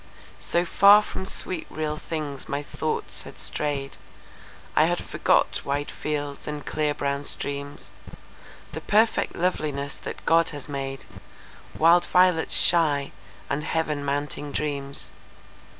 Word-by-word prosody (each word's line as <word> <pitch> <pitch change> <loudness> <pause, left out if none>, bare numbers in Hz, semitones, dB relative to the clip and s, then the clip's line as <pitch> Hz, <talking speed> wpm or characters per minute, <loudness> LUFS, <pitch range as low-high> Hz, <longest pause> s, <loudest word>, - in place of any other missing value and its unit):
So 175 +1 0
far 200 +4 +7
from 190 - -5
sweet 185 -3 -3
real 155 -1 -2
things 150 -4 -5
my 140 +1 -2
thoughts 155 +1 -3
had - - -11
strayed,I 140 -2 -3
had - - 0
forgot - - +2
wide 140 +1 -2
fields, 145 -2 -4
and 150 -1 -4
clear 150 -1 0
brown 140 0 -1
streams; 140 0 -5 0.8
The - - -6
perfect 220 +2 +2
loveliness 150 -6 -1
that - - -8
God 165 0 +4
has 145 -2 -7
made,—Wild 145 +4 -1
violets 180 -2 +3
shy 150 -5 +2 0.4
and 145 +2 -1
Heaven 155 -3 -1
mounting 145 +1 -2
dreams. 140 -2 -3
150 Hz, 120 wpm, -25 LUFS, 140-165 Hz, 0.8 s, far